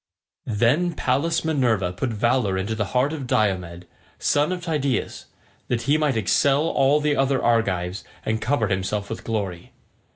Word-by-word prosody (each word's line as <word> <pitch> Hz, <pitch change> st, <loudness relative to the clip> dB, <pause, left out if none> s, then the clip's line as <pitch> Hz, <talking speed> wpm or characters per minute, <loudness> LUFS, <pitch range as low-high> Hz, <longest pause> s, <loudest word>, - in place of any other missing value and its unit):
Then 120 Hz, +11 st, +2 dB
Pallas 155 Hz, +5 st, 0 dB
Minerva 120 Hz, -, +1 dB
put 120 Hz, +7 st, -2 dB
valour 115 Hz, -3 st, +1 dB
into 100 Hz, +4 st, -2 dB
the 110 Hz, -1 st, -1 dB
heart 140 Hz, +5 st, +2 dB
of 140 Hz, -5 st, -5 dB
Diomed, 90 Hz, -6 st, 0 dB, 0.3 s
son 145 Hz, +4 st, +1 dB
of 180 Hz, -1 st, -4 dB
Tydeus, 140 Hz, -6 st, -2 dB, 0.4 s
that 120 Hz, -1 st, -1 dB
he 140 Hz, +5 st, +2 dB
might 150 Hz, -5 st, +1 dB
excel 135 Hz, +7 st, +2 dB
all 145 Hz, -2 st, +3 dB
the 150 Hz, -1 st, +1 dB
other 135 Hz, -1 st, +1 dB
Argives, 100 Hz, -6 st, 0 dB, 0.2 s
and 110 Hz, 0 st, -1 dB
cover 115 Hz, -4 st, 0 dB
himself 100 Hz, +2 st, -2 dB
with 115 Hz, -, -5 dB
glory. 100 Hz, -6 st, -4 dB
120 Hz, 155 wpm, -23 LUFS, 100-145 Hz, 0.4 s, all